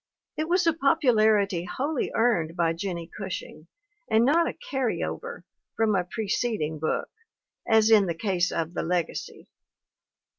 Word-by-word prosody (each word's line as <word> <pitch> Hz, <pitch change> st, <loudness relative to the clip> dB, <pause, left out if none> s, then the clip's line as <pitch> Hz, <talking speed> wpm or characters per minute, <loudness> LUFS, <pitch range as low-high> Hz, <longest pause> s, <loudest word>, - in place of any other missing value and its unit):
It 310 Hz, +1 st, -3 dB
was 355 Hz, 0 st, +3 dB
a 330 Hz, -, +4 dB
popularity 220 Hz, -, +3 dB
wholly 275 Hz, -, -2 dB
earned 180 Hz, -9 st, +1 dB
by 170 Hz, -2 st, +1 dB
Jennie 170 Hz, -1 st, -5 dB
Gushing 185 Hz, -5 st, -7 dB, 0.4 s
and 225 Hz, +2 st, +4 dB
not 330 Hz, +5 st, +3 dB
a -, -, -3 dB
"carry 265 Hz, -7 st, -2 dB
over" 475 Hz, +1 st, -6 dB, 0.3 s
from 220 Hz, -2 st, +2 dB
a 180 Hz, -, +2 dB
preceding 200 Hz, -5 st, -2 dB
book, 155 Hz, -, -2 dB, 0.6 s
as 220 Hz, -1 st, +4 dB
in 205 Hz, -3 st, +6 dB
the 170 Hz, -, -2 dB
case 180 Hz, -1 st, 0 dB
of 165 Hz, 0 st, -2 dB
The -, -, -2 dB
Legacy. 175 Hz, 0 st, -3 dB
215 Hz, 145 wpm, -26 LUFS, 175-255 Hz, 0.6 s, in